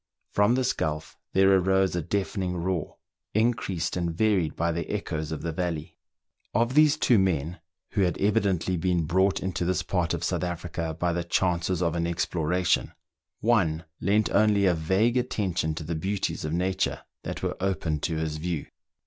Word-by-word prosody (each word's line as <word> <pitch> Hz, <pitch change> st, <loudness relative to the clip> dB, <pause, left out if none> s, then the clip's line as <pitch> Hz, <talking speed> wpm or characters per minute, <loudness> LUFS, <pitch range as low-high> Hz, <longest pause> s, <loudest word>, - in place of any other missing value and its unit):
From 105 Hz, +4 st, +4 dB
this 130 Hz, -1 st, +1 dB
gulf 75 Hz, 0 st, -3 dB, 0.2 s
there 95 Hz, 0 st, +5 dB
arose 95 Hz, 0 st, +2 dB
a 85 Hz, -, 0 dB
deafening 90 Hz, +1 st, -2 dB
roar, 85 Hz, -2 st, -2 dB, 0.4 s
increased 110 Hz, -7 st, 0 dB
and 85 Hz, -1 st, -1 dB
varied 90 Hz, -3 st, +1 dB
by 85 Hz, +1 st, 0 dB
the 85 Hz, +1 st, -3 dB
echoes 80 Hz, -6 st, -3 dB
of 80 Hz, -, -4 dB
the 85 Hz, -, -1 dB
valley. 85 Hz, -1 st, -3 dB, 0.6 s
Of 120 Hz, +3 st, +2 dB
these 150 Hz, 0 st, +5 dB
two 120 Hz, -7 st, +4 dB
men, 85 Hz, -3 st, 0 dB, 0.3 s
who 105 Hz, -, 0 dB
had 90 Hz, -2 st, +1 dB
evidently 100 Hz, -4 st, +1 dB
been 90 Hz, 0 st, +1 dB
brought 95 Hz, +5 st, +2 dB
into 95 Hz, -1 st, -2 dB
this 90 Hz, -1 st, 0 dB
part -, -, 0 dB
of -, -, -5 dB
South -, -, -1 dB
Africa 85 Hz, -2 st, -3 dB
by 85 Hz, -1 st, +1 dB
the 85 Hz, 0 st, -1 dB
chances 90 Hz, 0 st, 0 dB
of 85 Hz, -1 st, 0 dB
an 85 Hz, 0 st, 0 dB
exploration, 85 Hz, +1 st, 0 dB, 0.5 s
one 90 Hz, -9 st, +2 dB
lent 105 Hz, +3 st, +2 dB
only 105 Hz, -1 st, +4 dB
a 90 Hz, -, +4 dB
vague 95 Hz, +9 st, +2 dB
attention 95 Hz, -10 st, -1 dB
to 80 Hz, -, -5 dB
the 80 Hz, +2 st, -3 dB
beauties 95 Hz, +5 st, -2 dB
of 75 Hz, -, -2 dB
nature 90 Hz, +3 st, 0 dB, 0.2 s
that -, -, -6 dB
were -, -, -1 dB
opened 90 Hz, -6 st, -1 dB
to 80 Hz, -, -1 dB
his 80 Hz, -1 st, -2 dB
view. 85 Hz, -1 st, -3 dB
90 Hz, 175 wpm, -27 LUFS, 80-100 Hz, 0.6 s, there